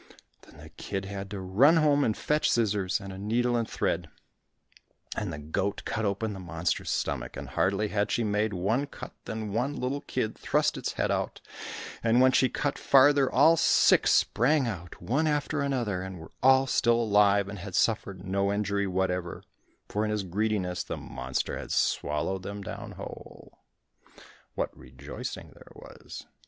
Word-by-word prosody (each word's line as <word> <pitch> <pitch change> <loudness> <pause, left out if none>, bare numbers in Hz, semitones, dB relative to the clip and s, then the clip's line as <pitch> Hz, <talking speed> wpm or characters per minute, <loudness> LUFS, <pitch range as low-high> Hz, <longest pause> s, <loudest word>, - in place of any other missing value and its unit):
Then - - -18
the - - -12
kid 95 -1 -5
had 100 0 -6
to 100 -1 -5
run 110 - +4
home 145 -2 +4
and 110 - 0
fetch 150 +1 +1
scissors, 105 -5 +1
and 100 -2 -8
a 95 - -8
needle 120 +4 +1
and 115 -2 -1
thread, - - -1 1.1
and 105 -5 -3
the 80 - -5
goat 80 +7 -2
cut 110 -1 -2
open 105 +2 -1
the 95 - -7
monster's 85 -2 -2
stomach, 65 -4 -2
and - - -7
hardly 100 +2 +1
had 105 0 0
she 120 - 0
make 105 0 0
one 105 +9 0
cut, - - -9
than 110 -2 -4
one 125 +6 0
little 135 +3 -2
kid 125 -6 -2
thrust - - +1
its - - -3
head - - 0
out, - - -2 0.6
and 115 +1 +4
when 130 0 +6
she 130 0 +3
cut 145 +2 -2
farther, 140 0 +5
all 160 +5 +6
six - - +4
sprang 135 +3 +3
out 90 -6 -6
one 145 +7 0
after 150 0 0
another, 120 -9 -1
and 95 0 -6
were 80 - -11
all 130 0 +6
still 120 -3 +2
alive, 100 -3 +4
and 100 0 -7
had 95 0 -7
suffered 100 -4 0
no 100 +1 0
injury 100 -1 0
whatever, 90 -2 -2 0.4
for 105 - -1
in 110 - -1
his 105 -1 -1
greediness 95 -1 -1
the - - -5
monster - - -4
had - - -7
swallowed 75 +6 0
them 100 +1 -6
down - - -7
whole. - - -11 1.0
What - - -2
rejoicing 65 0 -8
there - - -17
was! - - -11
105 Hz, 170 wpm, -28 LUFS, 95-125 Hz, 1.1 s, when